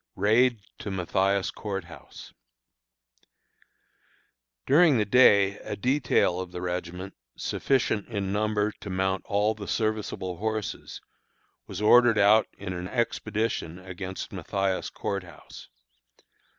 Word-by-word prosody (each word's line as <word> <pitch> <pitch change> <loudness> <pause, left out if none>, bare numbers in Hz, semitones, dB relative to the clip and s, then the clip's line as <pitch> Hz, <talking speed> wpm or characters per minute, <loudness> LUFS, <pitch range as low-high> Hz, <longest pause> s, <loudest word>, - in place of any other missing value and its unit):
RAID 110 +2 +3 0.2
TO 105 - -5
MATHIAS 95 +1 0
COURT 100 -3 -5
HOUSE. 85 -1 -13 2.3
During 150 -1 +5
the 105 - +1
day 100 -3 +5
a - - -5
detail 125 -7 +1
of 90 -1 -6
the 90 - -6
regiment, 90 +1 -4 0.2
sufficient 125 -6 0
in 100 -4 -3
number 105 0 0
to 100 - -8
mount 95 0 -1
all 105 +2 +1
the 105 -2 -9
serviceable 110 -5 -2
horses, 110 +1 -4 0.7
was 100 +2 -5
ordered 120 +1 +6
out 105 +2 +5
in 95 -2 -5
an 90 0 -5
expedition 110 -6 -2
against 95 +1 -7
Mathias 95 +1 -2
Court 100 -1 -3
House. 90 -2 -13
100 Hz, 115 wpm, -27 LUFS, 95-110 Hz, 2.3 s, ordered